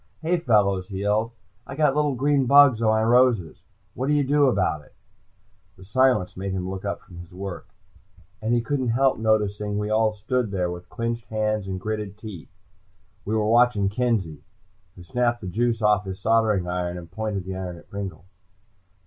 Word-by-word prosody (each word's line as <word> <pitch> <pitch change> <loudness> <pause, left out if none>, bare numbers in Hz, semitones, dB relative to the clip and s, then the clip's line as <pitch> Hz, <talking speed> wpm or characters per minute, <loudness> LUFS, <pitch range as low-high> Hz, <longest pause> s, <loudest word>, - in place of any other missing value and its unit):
"Hey, 175 +3 +1
fellows," 100 - +2
he 95 -1 -5
yelled. 105 +3 +1 0.4
"I 135 - -7
got 150 -2 +2
little 150 -2 +1
green 140 0 +1
bugs 140 -4 +6
on 115 - +2
my 110 0 +3
roses. 120 -7 +2 0.3
What 130 - -3
do 150 - +2
you 145 -1 +3
do 145 +1 +3
about 95 - 0
it?" - - -23 0.8
The 95 - -14
silence 125 -3 +2
made 95 +1 -4
him 90 -1 -3
look 95 0 -5
up - - -3
from 85 - -15
his 90 +1 -12
work, 95 0 -7 0.7
and 110 +2 -1
he 120 0 +3
couldn't 130 +1 -2
help 130 +2 +2
noticing 105 -2 0
we 105 +1 -2
all 110 0 +2
stood 115 +3 -1
there 90 -3 -1
with 90 0 -9
clinched 115 -2 -3
hands 110 -1 -1
and 95 -1 -4
gritted 105 0 -4
teeth. 100 - -9 0.8
We 110 - -1
were 110 -1 +1
watching 115 -3 +3
Kenzie, 100 -9 -1 0.5
who 90 - -12
snapped 120 +5 0
the - - -6
juice 115 +4 0
off 105 -1 +3
his 95 -1 -6
soldering 110 -4 +2
iron 90 0 -2
and 85 -2 -10
pointed 105 -2 -3
the 95 0 -5
iron 90 -2 -5
at - - -16
Pringle. 100 -2 -7
105 Hz, 190 wpm, -24 LUFS, 95-120 Hz, 0.8 s, bugs